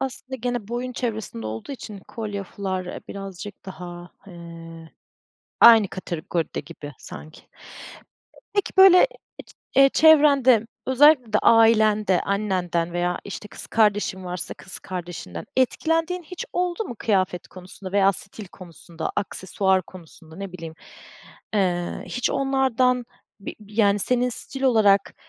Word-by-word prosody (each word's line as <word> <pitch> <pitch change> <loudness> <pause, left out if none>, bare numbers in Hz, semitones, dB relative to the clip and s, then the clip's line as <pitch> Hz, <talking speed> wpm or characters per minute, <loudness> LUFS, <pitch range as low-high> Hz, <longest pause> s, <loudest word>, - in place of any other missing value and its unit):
Aslında 265 0 -5
gene 245 -3 -3
boyun 245 +1 -4
çevresinde 220 - -4
olduğu 110 - -6
için, 215 -6 -9
kolye, 205 -3 -5
fular, 185 -1 -4
eee, - - -7
birazcık 195 0 -8
daha, 175 -1 -9 0.2
eee, 165 -2 -11 0.7
aynı 225 -4 +8
kategoride 170 -2 -4
gibi 145 -1 -10
sanki. 155 0 -11 1.1
Peki, 405 - 0
böyle, 380 +3 +8 0.7
eee, 275 0 +7
çevrende, 280 -7 +5 0.2
özellikle 260 -3 +5
de 210 - +4
ailende, 215 -4 +4
annenden 180 -4 -1
veya, 175 0 -1
işte, 210 +1 -8
kız - - -6
kardeşin 205 -3 +1
varsa 180 0 -5
kız 185 - -5
kardeşinden, 175 - -7
etkilendiğin 325 +7 0
hiç 345 +2 -7
oldu 360 +4 -1
mu 240 - -8
kıyafet 185 -4 0
konusunda 185 +1 -11
veya 195 -1 +4
stil 200 0 -7
konusunda, 170 -2 -8
aksesuar 190 -1 0
konusunda, 165 -2 -15
ne 195 -2 -7
bileyim, 165 -3 -8 0.8
eee, 175 -3 -1
hiç 245 - -2
onlardan 260 -2 +1 0.4
bi - - -7
yani, 205 -1 +1
senin 250 +4 +1
stil 270 +3 -4
olarak, 210 -6 +3
200 Hz, 125 wpm, -23 LUFS, 180-250 Hz, 1.1 s, aynı